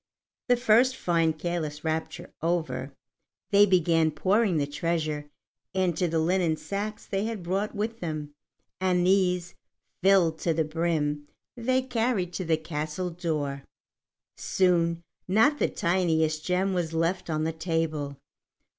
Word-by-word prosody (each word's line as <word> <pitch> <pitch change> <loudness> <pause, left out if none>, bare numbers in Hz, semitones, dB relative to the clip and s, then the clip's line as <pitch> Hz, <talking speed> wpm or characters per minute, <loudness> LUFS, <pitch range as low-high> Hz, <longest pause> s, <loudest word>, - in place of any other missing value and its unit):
The 245 - +5
first 245 +2 +4
fine 165 -5 +1
careless 155 -2 -4
rapture 160 +2 -3
over, 165 0 -1 0.6
they 205 0 +6
began 165 -3 +3
pouring 190 +4 +2
the 145 - +1
treasure 150 0 -2 0.5
into 180 -1 +1
the 165 0 -1
linen 165 0 +1
sacks 205 +4 -4
they 195 +1 -2
had 220 -5 -4
brought 195 +5 -2
with 225 +3 -3
them, 155 -3 -4 0.5
and 180 -1 +2
these, 180 -2 +2 0.5
filled 180 -4 +4
to 165 -2 0
the 160 - +2
brim, 155 -2 -1 0.3
they 255 +2 +1
carried 230 -7 -1
to 185 - -3
the 165 -2 +2
castle 155 +3 -4
door. 150 -5 -3 0.7
Soon 170 -2 +1 0.2
not 250 +10 +3
the - - +2
tiniest 160 -3 +1
gem 190 +2 +1
was 170 -3 -1
left 175 +3 0
on 155 -1 0
the 160 +1 -1
table. 160 -4 -2
170 Hz, 135 wpm, -27 LUFS, 160-190 Hz, 0.7 s, they